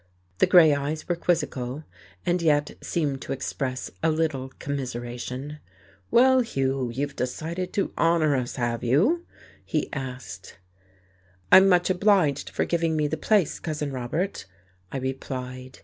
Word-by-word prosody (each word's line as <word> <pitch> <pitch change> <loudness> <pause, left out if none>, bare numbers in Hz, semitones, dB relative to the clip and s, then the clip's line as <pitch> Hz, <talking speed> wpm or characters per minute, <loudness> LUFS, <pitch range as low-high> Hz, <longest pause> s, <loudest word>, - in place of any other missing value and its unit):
The - - +5
grey 160 -4 +7
eyes 145 +2 -3
were 175 - +1
quizzical, 145 -5 -1 0.4
and 175 0 +1
yet 145 -3 +2
seemed 145 -5 -1
to - - -6
express 130 -1 -4
a 165 - +3
little 155 -5 -1
commiseration. 130 +1 -5 0.5
"Well, 260 +2 +5
Hugh, 135 - -1
you've 140 +4 -3
decided 165 +8 -3
to 200 - -1
honour 165 -3 +3
us, 125 -2 -2
have 120 -2 -2
you?" 200 - +2 0.4
he - - -2
asked. 125 -9 -7 0.9
"I'm 190 +1 +9
much 180 0 +3
obliged 180 -7 +2
for - - -1
giving 165 -2 0
me 155 -1 +1
the 160 - -2
place, 200 -2 +1
Cousin 150 -3 -3
Robert," 130 - -3 0.4
I - - -3
replied. 130 -1 -5
145 Hz, 135 wpm, -25 LUFS, 130-170 Hz, 0.9 s, I'm